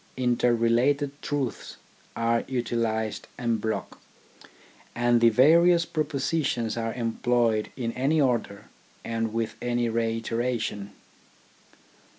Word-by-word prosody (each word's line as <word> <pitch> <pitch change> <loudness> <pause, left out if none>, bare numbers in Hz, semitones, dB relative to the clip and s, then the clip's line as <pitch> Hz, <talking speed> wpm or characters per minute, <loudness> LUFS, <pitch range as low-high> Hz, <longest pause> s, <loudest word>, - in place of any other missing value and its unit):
Inter 125 -1 +2
related 125 +5 +2
truths 140 -4 -4 0.4
are 115 0 +1
utilised 115 -3 -2
en 115 -2 0
bloc, 110 +1 -4 1.0
and 120 0 +2
the 115 - +7
various 170 +8 +5
propositions 145 -6 -1
are 115 -1 -3
employed 115 -2 0
in 120 -3 -2
any 140 +6 +1
order, 115 -6 0 0.4
and 115 -1 -2
with 115 0 -2
any 120 -1 0
reiteration. 115 -2 -2
120 Hz, 100 wpm, -26 LUFS, 115-130 Hz, 1.0 s, the